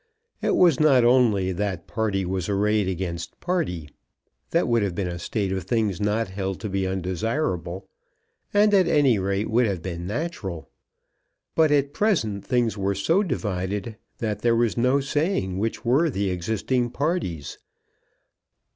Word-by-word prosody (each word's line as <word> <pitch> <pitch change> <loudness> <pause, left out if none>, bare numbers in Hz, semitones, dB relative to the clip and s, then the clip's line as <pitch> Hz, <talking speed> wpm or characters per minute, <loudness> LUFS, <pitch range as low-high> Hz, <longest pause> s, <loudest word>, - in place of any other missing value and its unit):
It - - +1
was 170 -7 +4
not 140 -5 +5
only 115 -7 +3
that 95 -2 -3
party 105 -4 -1
was 95 0 -2
arrayed 105 0 +1
against 85 -2 -4
party. 145 - -2 0.6
That 170 - +1
would 120 -2 +2
have 100 -4 -1
been 100 - -1
a 85 0 -5
state 95 +2 -2
of 95 -2 -3
things 105 -3 0
not 105 +1 0
held 95 0 -4
to 105 - -3
be 95 0 -1
undesirable, 95 - -2 0.6
and 205 +1 +4
at 190 -3 +5
any 145 -9 +3
rate 100 +2 -1
would 115 +2 +2
have 95 -5 -3
been 85 -1 -5
natural. 105 - -4 0.8
But 160 -1 +4
at 140 -1 +2
present 115 - 0
things 120 -5 +1
were 100 -1 -1
so 165 - +2
divided 105 - -3 0.2
that 105 -3 -2
there 120 -1 +3
was 115 -1 +1
no 125 +4 +2
saying 135 - -1
which 115 +3 -3
were 140 +8 +3
the 100 -6 -1
existing 110 +7 -1
parties. 140 - -2
105 Hz, 155 wpm, -24 LUFS, 95-130 Hz, 0.8 s, not